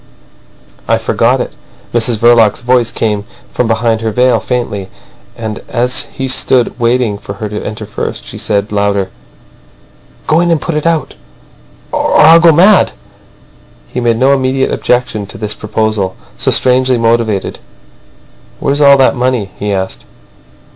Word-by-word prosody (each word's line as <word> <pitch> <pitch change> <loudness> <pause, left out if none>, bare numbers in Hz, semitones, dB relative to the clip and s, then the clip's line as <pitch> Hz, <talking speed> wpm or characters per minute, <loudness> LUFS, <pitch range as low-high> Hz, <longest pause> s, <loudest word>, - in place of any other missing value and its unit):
"I - - +2
forgot - - +1
it." - - -4 0.4
Mrs 120 -1 +1
Verloc's 115 -1 +4
voice 120 -1 +1
came 105 -2 -1 0.3
from 125 - 0
behind 115 0 0
her 115 - -1
veil 125 +3 +2
faintly. 105 -6 -3 0.5
And 110 -2 -5
as 125 +1 0
he 135 - -5
stood 130 -1 +1
waiting 120 -3 0
for 100 - -8
her 105 +2 -5
to 105 0 -5
enter 105 0 -6
first, - - -5
she - - -9
said 105 -1 -1
louder: 100 -2 0 1.1
"Go 155 - +2
in 175 0 +1
and 165 -2 +2
put 165 - -4
it 150 +2 -1
out—or 155 - -4
I'll 165 +2 +7
go 165 0 +6
mad." 185 - +4 1.0
He - - -4
made 120 -2 +1
no 130 +3 +3
immediate 130 0 0
objection 120 -4 -1
to - - -9
this 105 -1 -3
proposal, 105 -3 -2 0.2
so - - -1
strangely 130 0 +2
motived. 115 -3 0 1.0
"Where's 140 +2 0
all 140 -1 +7
that 135 0 +3
money?" 125 -6 -1
he 105 0 -2
asked. 95 -1 -4
115 Hz, 145 wpm, -12 LUFS, 105-130 Hz, 1.1 s, I'll